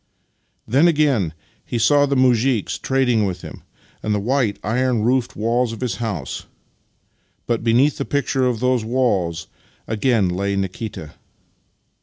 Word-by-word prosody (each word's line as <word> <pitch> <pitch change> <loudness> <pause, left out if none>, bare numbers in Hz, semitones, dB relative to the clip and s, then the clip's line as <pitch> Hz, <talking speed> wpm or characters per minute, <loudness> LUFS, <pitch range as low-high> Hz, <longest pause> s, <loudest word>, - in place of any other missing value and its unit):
Then 135 +9 +4
again 145 - +2 0.3
he 120 - -4
saw 145 +5 +4
the 140 - 0
muzhiks 125 -3 +2
trading 125 -5 +2
with 90 -2 -5
him, - - -9 0.4
and 105 -1 0
the - - 0
white, 115 -2 0
iron 120 +1 0
roofed 125 +1 +1
walls 115 +2 0
of 115 - -9
his 125 -3 -2
house 100 - -4 0.5
— - - -44
but 115 -1 -1
beneath 125 +5 +3
the - - 0
picture 135 -2 0
of 120 -3 -2
those 125 -2 +1
walls 100 -9 0 0.4
again 110 -2 +1
lay 100 +3 -1
Nikita. 95 -4 -5
120 Hz, 145 wpm, -21 LUFS, 105-130 Hz, 0.5 s, Then